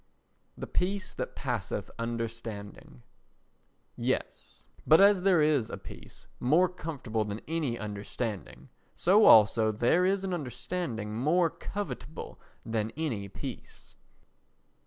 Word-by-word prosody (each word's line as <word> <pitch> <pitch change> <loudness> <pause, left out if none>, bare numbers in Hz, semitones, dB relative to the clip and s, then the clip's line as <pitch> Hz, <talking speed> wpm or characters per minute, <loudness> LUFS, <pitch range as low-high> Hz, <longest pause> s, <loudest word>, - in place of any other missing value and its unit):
The - - -5
Peace 190 +1 -2
that - - -5
Passeth 115 -6 -3
Understanding 115 - -6 0.9
Yes. - - -3 0.2
But 160 - +7
as 200 -1 +6
there 180 -4 +4
is 145 -7 +2
a - - -5
peace - - -12
more 160 +9 +4
comfortable 140 -11 -3
than 105 +1 -5
any 155 -7 -1
understanding, 100 - -5 0.3
so 205 +4 +5
also 110 0 +7
there 120 +11 +2
is 195 +1 +1
an 190 -1 -2
understanding 125 -6 -4
more 155 +8 +2
covetable 160 -6 -6 0.3
than 110 -1 -1
any 115 -11 -2
peace. 95 - -9
125 Hz, 115 wpm, -29 LUFS, 110-175 Hz, 0.9 s, But